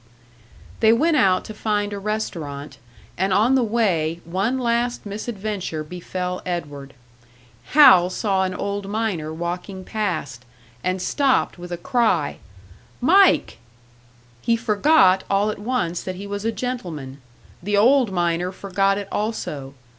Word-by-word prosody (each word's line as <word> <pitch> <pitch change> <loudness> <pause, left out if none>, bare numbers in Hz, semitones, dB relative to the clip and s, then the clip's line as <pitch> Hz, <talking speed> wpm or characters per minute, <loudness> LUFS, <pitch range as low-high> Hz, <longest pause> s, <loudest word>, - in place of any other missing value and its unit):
They 220 -1 +5
went 310 +8 +3
out 190 -8 +3
to 215 - -7
find 210 -1 -1
a 200 - -4
restaurant, 165 -9 -5 0.4
and 190 +1 +1
on 215 +7 +3
the 265 - +4
way 185 -8 0
one 195 +9 -1
last 240 -1 -1
misadventure 205 -5 -4
befell 180 +2 -5
Edward. 145 -6 -5 0.8
Hal 185 -12 +8
saw 190 0 0
an 185 -1 -2
old 200 0 -4
miner 200 -8 -2
walking 175 +3 -5
past, 165 - -3 0.4
and 185 +1 -1
stopped 265 -1 +1
with 175 0 -9
a 175 - -3
cry: 225 - 0 0.6
"Mike!" 370 - +4 0.8
He 230 - +2
forgot 210 -3 +4
all 200 +2 +2
at - - -8
once 205 -7 -2
that 185 - -5
he 195 +2 -8
was 200 +1 -5
a 225 - +1
gentleman; 170 - -5 0.4
the 205 +3 0
old 245 +1 +4
miner 175 0 0
forgot 195 +1 0
it 200 -1 -5
also. 150 -11 -4
195 Hz, 135 wpm, -22 LUFS, 175-225 Hz, 0.8 s, Hal